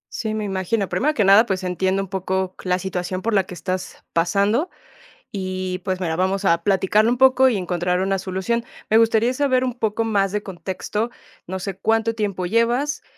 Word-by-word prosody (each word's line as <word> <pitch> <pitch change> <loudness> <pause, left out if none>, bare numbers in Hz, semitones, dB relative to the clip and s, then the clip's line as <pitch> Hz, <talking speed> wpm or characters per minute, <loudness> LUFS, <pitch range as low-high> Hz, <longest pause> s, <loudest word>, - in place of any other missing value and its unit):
Sí, 220 -2 -2
me 215 - -2
imagino. 195 +1 -1
Primero 280 +13 0
que 220 - +2
nada, 200 +4 +6
pues, 190 -1 -2
entiendo 190 +2 0
un 195 - -8
poco 190 0 -2
la 180 0 +2
situación 185 0 -4
por 230 - 0
la 195 -2 +3
que 180 - -9
estás 185 +1 -5
pasando. 200 - +1 0.6
Y 185 -1 -3
pues 185 -2 -1
mira, 165 -3 -1
vamos 190 +3 0
a 170 -3 +2
platicarlo 205 +4 +3
un 250 - 0
poco 260 0 +6
y 240 - 0
encontrar 180 -1 -1
una 195 0 +1
solución. 190 +5 -2 0.2
Me 220 - +5
gustaría 225 +1 +3
saber 260 -2 +2
un 250 -2 -2
poco 220 -1 0
más 200 -3 +1
de 210 +1 -1
contexto. 195 +5 -4 0.3
No 190 +2 -5
sé, 195 0 -4
cuánto 225 +2 +1
tiempo 200 -4 -2
llevas, 240 +8 +1
195 Hz, 190 wpm, -22 LUFS, 185-225 Hz, 0.6 s, nada